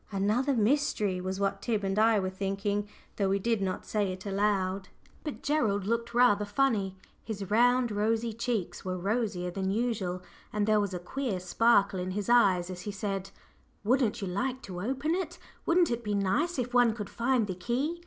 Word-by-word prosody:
"Another 215 +8 +1
mystery," 215 -5 +1
was 190 +1 -3
what 195 0 0
Tib 220 -4 -1
and 195 +1 0
I 220 -1 +5
were 185 -1 -2
thinking, 200 +2 -2 0.3
though 195 -2 +1
we 195 - +2
did 225 +1 0
not 185 -1 -2
say 205 -3 0
it 185 +1 -8
aloud. 195 -1 0 0.3
But 300 - -6
Gerald 220 -10 +1
looked 235 +2 -1
rather 240 -4 +5
"funny;" 205 -3 0 0.3
his 205 -3 -5
round 245 +2 +4
rosy 220 +2 0
cheeks 230 -4 -2
were 185 -1 -3
rosier 195 -2 -1
than 190 +1 -2
usual, 200 -5 -1 0.3
and 210 -1 0
there 215 0 +4
was 200 -3 -1
a - - -1
queer 215 +2 -3
sparkle 200 +1 +3
in 180 +1 -3
his 205 0 -3
eyes 190 -7 +4
as 180 -1 -7
he 205 - -4
said 195 -1 -3 0.5
"Wouldn't 240 -1 +2
you - - -2
like 250 +8 -2
to 180 -2 -6
open 270 - -1
it? 350 -2 -3 0.3
Wouldn't 340 -2 +4
it 235 0 -2
be 210 -2 -1
nice 245 - +1
if 245 -1 -2
one 245 -3 +4
could 210 -3 -5
find 235 -1 +1
the 190 - -3
key?" 255 - -2
210 Hz, 190 wpm, -29 LUFS, 195-240 Hz, 0.5 s, I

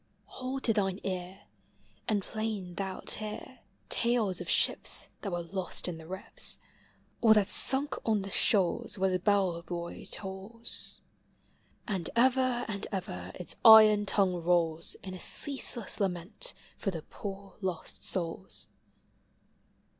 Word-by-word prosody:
Hold 265 +1 -6
to 225 - +3
thine 195 -2 -1
ear, 185 +1 -5 0.7
And 205 -3 +1
plain 215 -5 -4
thou 190 +1 -4
'It - - -3
hear 215 +4 -6 0.3
Talcs 230 -6 0
of - - -7
ships - - +2
Thai 200 - -4
were 175 -2 -3
lost 185 +1 -3
in 170 -2 -5
the 160 - -12
rips. 190 +2 -5 0.6
Or 220 -2 +6
that 210 -1 +3
sunk 275 +6 +7
on 215 -3 +1
the 195 - -7
shoals 210 +4 +1
Where 190 -1 +1
the 180 - -2
l»ell 195 -5 +2
buoy 170 0 -7
tolls. 195 +4 -1 0.9
And 190 -7 -2
ever 255 0 +2
and 200 -3 -4
ever 95 - -5
its 180 - -4
iron 215 -2 +8
tongue 190 -3 +2
rolls 165 -1 0
In 185 - -7
a 185 - -8
ceaseless 255 - -1
lament 195 - -1 0.2
for 200 - -2
the 165 -5 -5
poor 195 -1 -9
lost 185 -4 -5
souls. 185 +1 -2
195 Hz, 140 wpm, -30 LUFS, 180-220 Hz, 0.9 s, iron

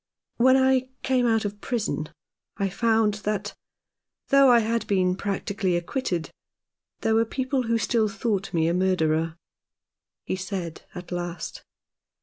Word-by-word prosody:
"When 260 +2 +5
I 260 -1 +3
came 255 -2 +2
out 225 -2 +2
of 205 0 -5
prison 215 - -2 0.5
I 200 -1 0
found 220 +1 +2
that, 205 -1 -2 0.8
though 275 -1 +6
I 240 - +7
had 230 0 0
been 185 -2 +2
practically 200 -1 -1
acquitted, 175 - -2 0.7
there 225 - +2
were 225 +1 +4
people 260 +1 -2
who 230 0 +2
still 225 -1 +1
thought 205 -2 -2
me 165 -2 +1
a 170 - +1
murderer," 165 -3 +1 0.9
he - - -2
said 185 -3 -5
at 180 0 -8
last. 175 -1 -5
205 Hz, 135 wpm, -25 LUFS, 180-230 Hz, 0.9 s, I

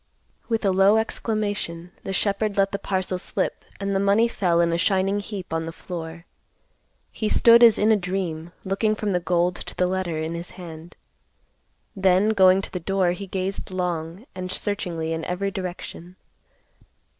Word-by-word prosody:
With 225 -2 0
a 195 - +4
low 195 +3 +5
exclamation, 205 -6 -2
the - - -5
shepherd 200 +2 0
let 195 0 +3
the 200 - -3
parcel 185 -1 -2
slip, - - -2 0.2
and 200 0 -1
the - - +2
money 200 +4 +4
fell 180 -7 +1
in 170 -1 +3
a - - +1
shining 195 +2 +2
heap 200 -4 -6
on 165 0 -1
the - - -4
floor. 165 -1 -7 0.9
He 215 - -2
stood 235 0 +7
as 230 -3 +8
in 215 +2 +3
a - - +6
dream, 180 -4 -3
looking 210 +3 +1
from 210 -1 -2
the 180 - +2
gold 175 0 +1
to - - -7
the 180 - +2
letter 180 -3 -1
in 160 +1 -3
his 170 +1 -5
hand. 165 -1 -10 1.0
Then, 190 +1 +3
going 190 -2 +5
to - - -7
the 180 - -3
door, 190 0 +1
he 195 +3 -5
gazed 190 +1 -3
long 180 +1 -3
and 185 0 -5
searchingly 170 -6 -2
in 160 0 -3
every 195 +2 -2
direction. 180 -1 -7
185 Hz, 175 wpm, -24 LUFS, 175-200 Hz, 1.0 s, as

